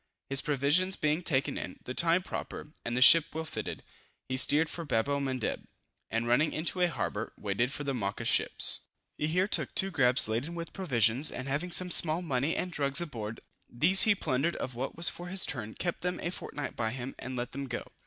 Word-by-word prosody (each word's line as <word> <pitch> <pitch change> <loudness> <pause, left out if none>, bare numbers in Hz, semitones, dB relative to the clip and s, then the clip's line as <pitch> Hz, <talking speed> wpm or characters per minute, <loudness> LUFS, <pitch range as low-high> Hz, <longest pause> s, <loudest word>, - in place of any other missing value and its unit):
His 135 0 +6
provisions 150 +7 +1
being 155 +2 0
taken 140 -4 -1
in, - - -7
the 130 - -6
time 170 +5 +3
proper, 150 -4 -7
and 120 +1 -3
the 125 - +5
ship 165 +3 +8
well 160 0 -3
fitted, - - -6 0.4
he 130 - -3
steered 145 +4 +4
for 170 - -6
Babel 140 0 0
Mandeb, 130 -3 -3 0.4
and 115 +1 -2
running 135 +6 +2
into 170 +3 -2
a 180 - +4
harbor, - - -4
waited 105 +5 -1
for 145 - -4
the 140 -1 -2
Mocha 100 -5 -3
ships. - - +1 0.3
He 150 - 0
here 180 +4 +1
took - - +1
two 195 0 +2
grabs 130 - +5
laden 120 +10 -3
with 170 -1 -7
provisions, 130 - +2
and 130 - -6
having 145 +6 -2
some 180 +1 +2
small 165 +1 +5
money 140 0 -1
and 180 - -3
drugs 140 -2 0
aboard. 115 -10 -6 0.3
These 170 +10 +4
he 215 -2 +7
plundered 150 0 -1
of 130 - -5
what 125 +3 -5
was 170 - +2
for 175 - -2
his 190 +1 +4
turn, 110 -5 -5
kept 175 -2 -4
them 180 0 -3
a 175 - -2
fortnight 145 -6 -6
by 110 -1 -2
him, 130 +1 -6
and 130 0 -6
let 120 0 -4
them 140 +1 -5
go. - - -4
145 Hz, 210 wpm, -29 LUFS, 125-170 Hz, 0.4 s, ship